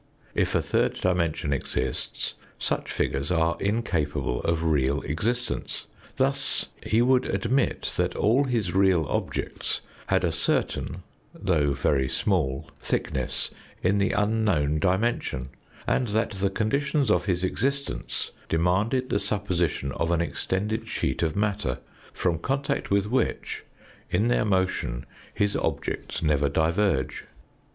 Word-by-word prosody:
If - - +1
a - - +3
third - - +1
dimension 85 -5 +1
exists, 65 -1 -2 0.2
such - - -1
figures 70 +3 -1
are 80 -1 +2
incapable 95 - 0
of 85 -1 0
real 70 -3 +2
existence. 115 +12 -2 0.3
Thus 135 +1 0
he 115 +2 +3
would 130 0 +4
admit 125 +3 +1
that - - +1
all 125 +7 +3
his 115 -9 0
real 95 -4 +4
objects - - -2 0.3
had - - +2
a - - +2
certain, - - -1 0.3
though 75 -7 +2
very 70 -1 +2
small 75 -10 0
thickness 65 -2 -1 0.3
in 100 +3 +3
the 100 - +3
unknown 105 -9 +2
dimension, 95 - 0 0.4
and 125 - +1
that 110 +2 +1
the 100 -1 0
conditions 140 +5 +1
of 90 -2 +3
his 90 -2 0
existence 140 +8 -1 0.2
demanded 100 +10 +1
the 100 - +3
supposition 90 -10 0
of 85 +3 -1
an 85 -1 +2
extended 95 +7 -1
sheet - - -1
of 80 -2 +1
matter, 105 0 0 0.3
from 85 -3 0
contact 135 +8 -1
with 100 0 +3
which 125 +5 -1 0.5
in 105 +6 +2
their 120 - +3
motion 95 - 0 0.3
his 100 0 +1
objects - - -2
never 75 -2 +3
diverge. 80 -1 +1
95 Hz, 130 wpm, -26 LUFS, 80-110 Hz, 0.5 s, would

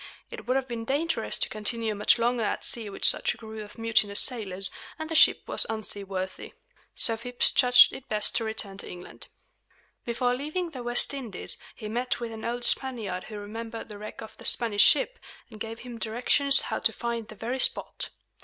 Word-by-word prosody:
It - - -9
would 255 - +1
have 265 -1 0
been 235 -2 -4
dangerous 290 +7 -1
to - - 0
continue 220 +1 -2
much 210 +3 +4
longer 240 +1 +1
at 215 - -1
sea 225 -3 -2
with 195 - -2
such - - +3
a - - -19
crew 220 -1 -8
of 210 - -14
mutinous 220 -3 +1
sailors; 195 -6 -1 0.3
and 315 - -5
the 325 - -5
ship - - +6
was - - +1
unseaworthy. 195 -3 -5 0.4
So 225 - +7
Phips 245 +2 +1
judged 250 -1 +7
it 265 - -10
best 210 -1 +3
to 230 - -1
return 215 -3 -4
to - - -6
England. 180 0 -8 0.8
Before 245 +1 0
leaving 310 +7 -3
the 260 -5 -7
West 240 +3 0
Indies, 240 -9 -5 0.2
he 215 - -7
met 245 +4 -2
with 235 -1 -5
an 220 -1 -8
old 240 +1 -3
Spaniard 220 -9 +1
who 215 - -8
remembered 225 +3 -7
the 205 -1 -9
wreck 215 +1 -8
of 220 - -10
the - - -12
Spanish 220 -4 +3
ship, 475 - +4 0.3
and 215 - -11
gave 225 +1 -6
him 240 -2 -9
directions 250 +5 +2
how - - -3
to - - +3
find 235 -2 -4
the 215 - -11
very 240 +5 -4
spot. - - 0
230 Hz, 200 wpm, -27 LUFS, 215-245 Hz, 0.8 s, So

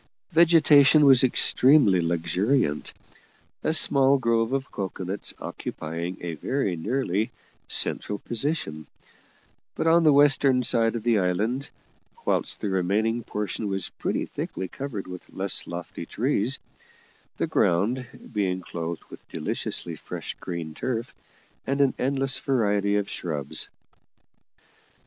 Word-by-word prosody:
Vegetation 155 -3 +6
was 135 -2 +7
extremely 125 - +5
luxuriant, 85 - 0 0.7
a - - +1
small 140 -3 +4
grove 115 -2 +1
of 135 -1 -2
cocoanuts 95 0 -4
occupying 85 +3 -5
a 85 -1 -4
very 100 - -1
nearly 110 +3 -1 0.4
central 105 - 0
position, 110 - -2 0.9
but - - -2
on 165 +1 +5
the 155 - +6
western 140 -2 +4
side 115 -1 +2
of 115 - -4
the 115 -3 +3
island; 110 +9 -1 0.6
whilst - - -1
the 105 - -1
remaining 105 +5 0
portion 105 0 -4
was 95 -2 -2
pretty - - -1
thickly 95 - -5
covered 125 -3 -6
with 90 -1 -10
less 95 +1 0
lofty 85 0 -7
trees, - - 0 0.8
the - - 0
ground 115 +9 +1 0.3
being 95 -3 0
clothed 85 -2 -5
with - - -13
deliciously - - -3
fresh - - -6
green 85 -3 -5
turf, 120 +6 -3 0.5
and 135 +1 0
an 140 -2 +4
endless 135 0 +1
variety 105 -6 +1
of 100 -1 0
shrubs. 75 -6 -4
110 Hz, 120 wpm, -25 LUFS, 90-135 Hz, 0.9 s, was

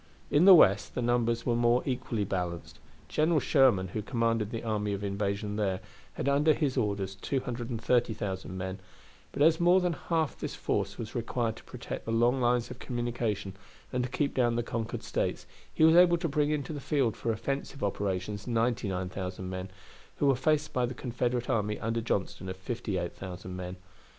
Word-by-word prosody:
In 150 +5 +5
the 195 -1 +11
West 100 - +4
the - - -1
numbers 120 -1 +1
were 120 - +2
more 120 +1 +3
equally 125 -5 -1
balanced. 90 -4 -4 0.3
General 155 +1 +2
Sherman, 125 - +3
who 110 - -3
commanded 115 -1 0
the 115 -1 -5
army 105 -2 -1
of 100 +1 -4
invasion 100 +1 -2
there, 95 -3 0 0.3
had - - -3
under 145 +2 +4
his 145 -5 0
orders 100 -5 -1
230,000 115 -4 -2
men, 95 +1 -4 0.5
but 145 - +1
as 160 +1 +5
more 175 +2 +5
than 180 -2 0
half 160 -2 -1
this - - -4
force 100 0 -1
was 110 -2 -6
required 115 -1 -1
to - - -13
protect - - -7
the 115 - -3
long 120 +3 +3
lines 120 -1 +1
of - - -9
communication 120 -5 -2 0.4
and 125 0 +1
to 125 - -3
keep 140 +3 -1
down 120 -2 +2
the 120 - 0
conquered 115 -1 -4
States, - - -2 0.3
he - - +1
was 160 +1 +7
able 175 -1 +7
to 165 - -2
bring 150 0 +1
into 150 -1 -2
the 145 - -5
field 135 -6 +1
for 115 - -1
offensive 135 +4 -3
operations 100 +1 -2
99,000 95 -6 -2
men, 95 +1 -5 0.5
who - - 0
were 135 -1 +5
faced 155 +4 +1
by 125 -1 +1
the 125 - -6
Confederate 120 -1 -2
army 105 -1 0
under 115 +1 -1
Johnston 95 -3 -2
of 95 - -5
58,000 95 -3 -4
men. 90 0 -5
115 Hz, 180 wpm, -29 LUFS, 100-130 Hz, 0.5 s, the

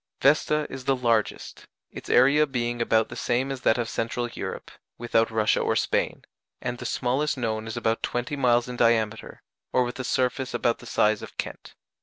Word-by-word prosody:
Vesta 150 +1 +3
is 130 -1 -8
the 135 - +3
largest 115 -4 -1 0.2
its - - -9
area 140 +4 +5
being 120 -3 -2
about 110 -1 +2
the - - -8
same 130 +3 0
as 135 -2 -5
that 110 - +3
of 120 -1 -1
Central 115 +1 -2
Europe, - - -6 0.3
without 115 -1 +1
Russia 110 -1 +2
or - - +1
Spain - - 0 0.4
and 120 -1 -4
the - - -4
smallest 140 +4 0
known 110 -3 -2
is 110 - -5
about 115 0 0
twenty 120 +4 -2
miles 120 -3 +2
in 125 - -5
diameter, 110 -2 0 0.3
or 125 - +3
with 120 +1 -5
a - - -2
surface 125 0 -1
about 120 -1 +1
the 120 - -12
size 105 -1 +2
of - - -10
Kent. - - -6
120 Hz, 190 wpm, -26 LUFS, 115-130 Hz, 0.4 s, area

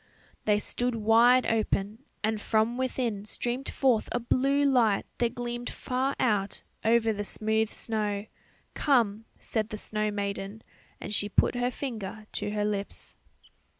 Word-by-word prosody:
They 210 -1 +4
stood 245 +3 -1
wide 230 +3 +5
open, 220 +1 -1 0.2
and 220 -1 0
from 220 +3 +1
within 250 -5 -1
streamed 245 +5 -2
forth 250 -5 +2
a 245 - 0
blue 275 +4 +2
light 235 -7 +3
that 235 -1 +1
gleamed 240 0 -4
far 260 +2 -2
out 205 -5 0 0.2
over 225 0 +3
the 205 0 -3
smooth 220 +1 +1
snow. 210 -3 -2 0.5
"Come," 225 -7 +2
said 220 -1 -2
the 215 - -5
snow 215 0 -1
maiden, 200 +1 -4 0.4
and 205 - -5
she 205 0 +1
put - - +3
her 245 0 0
finger 220 -5 -5
to - - -2
her 210 0 -1
lips. 205 -1 -4
220 Hz, 145 wpm, -28 LUFS, 210-245 Hz, 0.5 s, wide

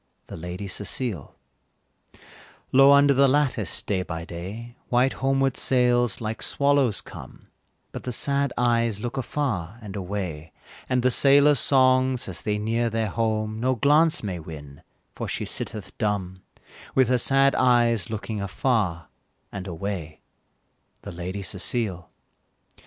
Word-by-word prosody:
The - - -9
Lady 90 +4 -6
Cecile. 105 - -3 1.4
Low 135 +1 +7
under 140 0 +6
the 140 +1 +4
lattice, 135 -6 0
day 95 -3 -1
by 80 -2 -6
day, 100 +8 -8
White 125 +2 +2
homeward 135 -1 0
sails 120 -3 +2
like 110 -1 -4
swallows 140 -6 +1
come, - - -12 0.4
But - - -7
the 125 - -2
sad 140 +3 0
eyes 115 -3 +1
look 120 +2 -5
afar 120 - -3
and 105 -4 -9
away, 90 -5 -5 0.4
And 125 -1 +1
the 130 - +3
sailors' 140 +2 +5
songs 130 -1 +3
as 95 - -6
they 105 -1 -1
near 115 +3 0
their 110 -1 -1
home, 110 0 -1
No 130 +2 +1
glance 150 +5 +3
may 95 -4 -4
win, 75 -3 -10 0.3
for - - -5
she - - -3
sitteth 105 -4 -6
dumb, 95 -4 -2 0.5
With 130 -2 +4
her 125 -1 +3
sad 135 +2 +4
eyes 120 -6 +2
looking 110 -1 -4
afar 95 - -1 0.4
and 100 -1 -6
away, 85 -3 -5 0.8
The - - -7
Lady 90 +3 -5
Cecile. 95 - -2
115 Hz, 135 wpm, -24 LUFS, 95-130 Hz, 1.4 s, Low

